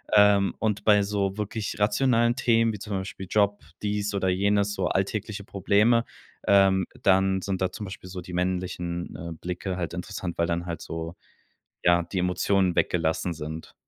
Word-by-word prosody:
Ähm, 100 -1 +5
und 105 -2 -1
bei 105 -2 +5
so 100 -1 -1
wirklich 105 0 -3
rationalen 115 +3 +3
Themen 115 -4 +2
wie 105 - -7
zum 105 -1 -6
Beispiel 95 0 -6
Job, 100 -5 +2 0.2
dies 105 0 -1
oder 95 -1 +1
jenes, 100 +2 +2
so 95 -3 -1
alltägliche 100 +1 -2
Probleme, 105 +4 +2 0.4
ähm, 95 -2 +5 0.2
dann 95 0 +3
sind 95 -1 -2
da 90 -1 +1
zum 105 - -7
Beispiel 95 -1 -9
so 90 0 -6
die 90 0 -10
männlichen, 90 -1 -2
äh, 85 0 -6
Blicke 90 +1 -4
halt 85 -2 -3
interessant, 90 -1 -5
weil 85 - +2
dann 85 +1 -1
halt 85 -2 -5
so, 80 +1 -6 0.7
ja, 85 0 +5
die 90 +3 -6
Emotionen 90 0 +1
weggelassen 85 +1 +1
sind. 80 +1 -7
95 Hz, 170 wpm, -26 LUFS, 90-105 Hz, 0.7 s, Ähm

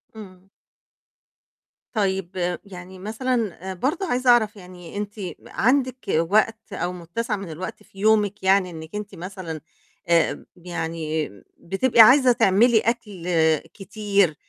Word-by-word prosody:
إمم. 190 -3 -12 1.4
طيب، 190 -4 -1
يعني 185 -1 -11
مثلًا 215 -3 -2
برضه 275 - -1
عايزة 250 -1 +1
أعرف 220 -2 +4
يعني، 180 -1 -11
أنتِ 205 0 -4 0.3
عندِك 255 +2 +1
وقت 215 +5 +1
أو 175 -1 -2
متّسع 195 +6 -3
من 195 -3 -7
الوقت 185 +4 -7
في 195 - -17
يومِك 210 -1 +2
يعني، 190 -1 +3
إنِّك 160 +2 -9
أنتِ 210 -1 -6
مثلًا 170 -3 -7 0.5
آآ، 170 -1 +2
يعني 165 -3 -3 0.3
بتبقى 230 +6 +3
عايزة 255 +2 +7
تعملي 220 +2 +4
أكل 210 -7 -3 0.5
كتير 200 -4 0
195 Hz, 115 wpm, -23 LUFS, 180-220 Hz, 1.4 s, عايزة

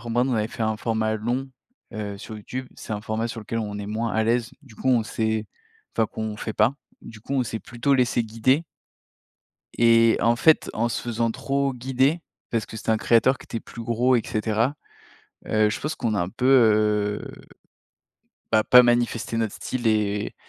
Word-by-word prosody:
format, 120 +1 -1
on 130 -1 0
avait 110 -1 0
fait 115 - -5
un 110 0 0
format 110 -1 -1
long, 125 +5 -2 0.4
heu, 105 -2 -5
sur 110 +1 -8
YouTube, 130 +5 -6
c'est 110 - -7
un 105 - -3
format 110 +1 -2
sur 115 -1 -6
lequel 115 +2 -4
on 105 -2 -4
est 100 - -5
moins 110 +2 -2
à 110 - +1
l'aise, 120 +1 +1
du 125 -6 -17
coup - - -2
on 120 -3 +4
s'est 110 -1 -2 0.5
enfin 110 -1 +3
qu'on 110 -1 -5
fait 110 - -4
pas, 110 +6 +2 0.3
du 110 -2 -11
coup 140 - -5
on 130 - +2
s'est 110 -1 -4
plutôt 125 +5 -1
laissé 125 -2 +2
guider. 130 +8 +1 1.1
Et 115 -1 +5
en 120 +1 +3
fait, 160 +5 +4
en 115 +2 0
se - - -3
faisant 115 -1 -1
trop 135 +2 -1
guider, 135 +6 +1 0.3
parce 115 -2 -1
que - - -9
c'était 110 - -3
un 110 - +4
créateur 120 +4 +3
qui - - -13
était 115 - -5
plus 115 - -10
gros 120 +2 +2
et 115 - 0
cetera, 110 +5 0 0.7
heu, 110 -1 +3
je - - -3
pense 150 +2 -3
qu'on 115 -4 -1
a 100 - +1
un 90 - -2
peu, 125 +3 -4
heu, 105 -4 +3 1.3
bah, 110 -1 +3
pas 125 0 +8
manifesté 120 -1 +1
notre 115 -2 -1
style 125 -2 -4
et 105 -2 0
115 Hz, 200 wpm, -24 LUFS, 110-125 Hz, 1.3 s, pas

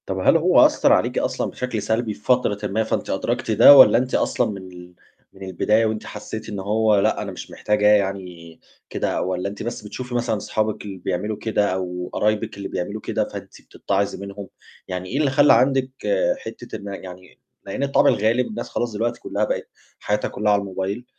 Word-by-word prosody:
طب - - -3
هل - - +4
هو - - +5
أثّر - - +3
عليكِ - - +1
أصلًا - - -2
بشكل 125 -4 -3
سلبي 110 +1 -1
في 105 - -16
فترةٍ 105 -4 +1
ما، 110 +3 0
فأنتِ 110 - -3
أدركتِ - - -2
ده؟ 140 - +9
والّا 130 - +8
أنتِ 125 +1 -1
أصلًا 120 -3 +1
من 100 - -6
ال 90 0 -13 0.4
من 95 0 -12
البداية 105 +4 +1
وأنتِ 110 -1 -3
حسّيتِ 110 +1 -7
إن 105 -2 -5
هو 105 +1 +2
لأ، - - +1
أنا - - -5
مش - - -9
محتاجة 105 0 0
يعني 95 -5 0 0.3
كده، - - -2
والّا 90 +1 -2
أنتِ 100 +1 -8
بس 120 +1 -5
بتشوفي 125 +3 -6
مثلًا 120 -2 0
أصحابِك 110 +1 -2
اللي 100 -2 -7
بيعملوا 95 +4 -3
كده 105 -3 0
أو 90 -1 -4
قرايبِك 105 0 -1
اللي 100 - -5
بيعملوا 100 +4 -4
كده، - - -2
فأنتِ - - -10
بتتعظي 100 0 -2
منهم؟ 100 0 -8 0.4
يعني 90 0 -5
إيه 130 - -3
اللي 150 -2 +2
خلّى 145 +2 +5
عندِك 130 +2 +2 0.5
حتّة - - -9
إن 100 -2 -8 0.2
يعني 90 0 -12 0.3
لإن 100 +8 -4
الطبع 140 0 +3
الغالب 115 +4 +1
الناس 215 - -6
خلاص 120 -2 -3
دلوقتي 115 +3 -2
كلّها - - -3
بقِت - - -3 0.3
حياتها 105 0 -1
كلّها 105 0 0
على 100 - +3
الموبايل، 100 +4 -4
105 Hz, 195 wpm, -22 LUFS, 95-115 Hz, 0.5 s, ده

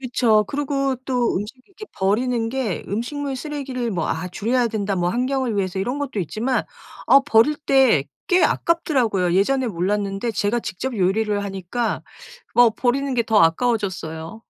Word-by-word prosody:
그쵸. 235 -4 +2
그러고 275 -2 -1
또 250 -3 0
음식 205 +5 -4
이렇게 400 +2 -11
버리는 225 +4 0
게 235 -8 -2
음식물 270 +7 -3
쓰레기를 265 -4 -4
뭐 170 -4 -2
'아 160 +3 -2
줄여야 235 +7 0
된다.' 205 -3 -2
뭐 175 -1 +1
환경을 255 -1 -1
위해서 190 -1 -1
이런 245 +8 -2
것도 275 -6 -4
있지만 225 - -1 0.4
아 275 - +7
버릴 290 +3 +4
때 265 - +3 0.2
꽤 365 0 +4
아깝더라고요. 235 - +1
예전에 260 +7 +2
몰랐는데 200 +2 -1
제가 220 +2 0
직접 230 +5 -4
요리를 205 +2 +1
하니까 195 +4 -3 0.5
뭐 245 -1 +6
버리는 265 +4 0
게 240 - +2
더 220 -1 +1
아까워졌어요. 185 -1 0
230 Hz, 340 characters per minute, -22 LUFS, 195-265 Hz, 0.5 s, 아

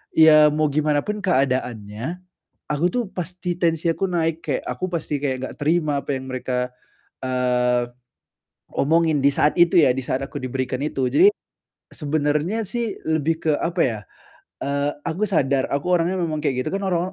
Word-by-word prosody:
ya, 155 -1 +8
mau 150 -1 +1
gimanapun 155 +7 0
keadaannya, 130 - -1 0.5
aku, 150 +3 0
tuh, 250 -1 +1
pasti 180 -1 -4
tensi 165 -1 +1
aku 180 +4 0
naik, 165 -3 -1
kayak - - -1
aku 185 - -3
pasti 155 -3 -2
kayak 140 -2 -1
enggak 130 - -6
terima 150 -2 +1
apa - - -13
yang 130 0 -5
mereka, 125 -1 -2 0.6
eee, 125 -1 +1 0.8
omongin, 160 0 +2
di 140 - +5
saat 150 +1 +2
itu, 175 0 +5
ya, 135 -4 +4
di 135 - -3
saat 130 +1 -2
aku - - -7
diberikan 130 0 -3
itu. 135 -3 -1
Jadi, 375 - +6 0.6
sebenarnya, 150 +7 -1
sih, 230 -2 -2
lebih 160 0 +1
ke, 155 - +5
apa 175 +1 -1
ya, 115 -5 -1 0.6
eee, 140 +1 0 0.2
aku 185 +6 -1
sadar 140 -7 +2
aku 140 +5 -1
orangnya 180 +2 +2
memang 160 -3 -1
kayak 130 -3 +1
gitu, - - -2
kan, 200 - -2
orang 180 0 0
150 Hz, 165 wpm, -22 LUFS, 130-170 Hz, 0.8 s, ya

